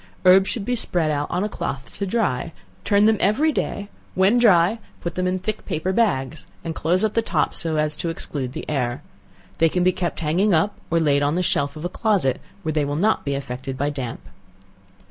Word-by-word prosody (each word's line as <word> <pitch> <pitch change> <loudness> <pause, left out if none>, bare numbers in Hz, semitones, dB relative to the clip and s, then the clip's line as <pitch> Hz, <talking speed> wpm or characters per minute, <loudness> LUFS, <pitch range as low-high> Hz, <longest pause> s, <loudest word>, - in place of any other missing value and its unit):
Herbs 190 +1 +6
should 215 -4 -3
be 245 - 0
spread 175 -8 +1
out 145 0 -1
on 180 - -1
a - - 0
cloth 135 -9 -5
to 200 - -1
dry; 185 - -1 0.3
turn 205 0 +4
them 220 0 +4
every 275 +11 +3
day; 205 -7 -3 0.3
when 195 +6 +4
dry, 205 -1 +4 0.2
put 170 - -4
them 185 +1 -1
in 185 +1 0
thick 215 +3 -4
paper 170 +5 -1
bags, 160 - 0 0.2
and 165 0 -3
close 175 +5 +1
up 220 - +1
the 230 - +2
top, 165 -9 0
so 165 -2 -1
as 150 0 +1
to 170 - -2
exclude 140 -5 -4
the - - -6
air. 125 -4 -2 0.6
They 165 - +5
can 180 +2 0
be 185 - +4
kept 175 -2 -3
hanging 175 +5 +2
up, 180 +6 +1
or 165 - +2
laid 145 -3 +2
on 145 +2 +1
the 180 - +1
shelf 140 -4 0
of 155 +2 -6
a - - +2
closet, 190 - +1 0.2
where 160 -1 -1
they 150 -1 +1
will 145 0 -2
not 210 +8 +2
be 140 -1 -1
affected 130 0 -5
by 145 +2 0
damp. 130 -5 -5
170 Hz, 220 wpm, -22 LUFS, 145-200 Hz, 0.6 s, Herbs